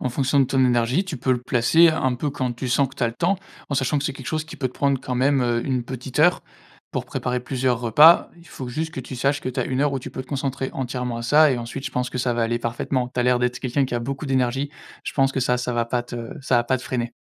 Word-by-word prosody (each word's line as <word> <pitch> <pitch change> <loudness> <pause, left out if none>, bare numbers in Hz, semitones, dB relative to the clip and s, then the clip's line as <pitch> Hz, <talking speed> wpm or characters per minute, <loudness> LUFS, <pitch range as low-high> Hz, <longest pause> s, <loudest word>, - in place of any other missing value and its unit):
En 130 - -1
fonction 140 +2 +2
de 135 - +5
ton 130 0 +2
énergie, 125 +7 +2
tu 180 -5 -5
peux 130 +1 +1
le 125 - -1
placer 130 +8 +4
un 130 -5 +1
peu 145 +4 -2
quand 130 -2 -2
tu 125 +2 -5
sens 135 +2 +2
que 130 - -16
tu - - -4
as 120 - +2
le 115 - -7
temps, 180 +8 +1 0.3
en 140 - -2
sachant 135 +2 +1
que 140 - -4
c'est 140 - -1
quelque 135 -1 -10
chose 155 -1 -2
qui 160 - -10
peut 130 - -1
te - - -16
prendre, 140 -2 +1
quand 130 - -4
même, 135 +1 +2
heu, 120 -1 0
1 130 -3 -1
petite 130 +2 -6
heure 175 +4 +4 0.5
pour - - -2
préparer 125 0 -2
plusieurs 125 -1 -1
repas. 150 +9 +6
Il 170 0 -17
faut 130 -2 -7
juste 160 +5 -3
que - - -5
tu 130 +1 -8
saches 140 +3 +1
que - - -4
tu 130 - -2
as - - 0
1 130 +1 -1
heure 145 -1 +2
où 135 - -1
tu - - -8
peux 130 - -5
te - - -21
concentrer 135 -1 -2
entièrement 125 -2 -3
à - - -5
ça 150 +5 +5
et 125 - 0
ensuite 120 +4 -6
je - - -4
pense 125 0 -1
que 125 - -4
ça 125 -1 +1
va 120 - 0
aller 120 +1 0
parfaitement. 125 +2 -2
Tu - - -4
as - - +3
l'air 125 0 +3
d'être 125 0 0
quelqu'un 135 +2 0
qui 125 - -4
a 120 - 0
beaucoup 135 +5 -4
d'énergie. 135 +1 0 0.3
Je - - -4
pense 135 -1 +2
que 135 - -1
ça, 125 0 +1
ça 125 0 -2
va 120 0 +1
pas 120 +1 -1
te 120 -1 -7
ça 125 - +2
va 120 - +2
pas 130 +2 +1
te 125 - -11
freiner. 120 -2 -3
130 Hz, 310 wpm, -23 LUFS, 120-140 Hz, 0.5 s, repas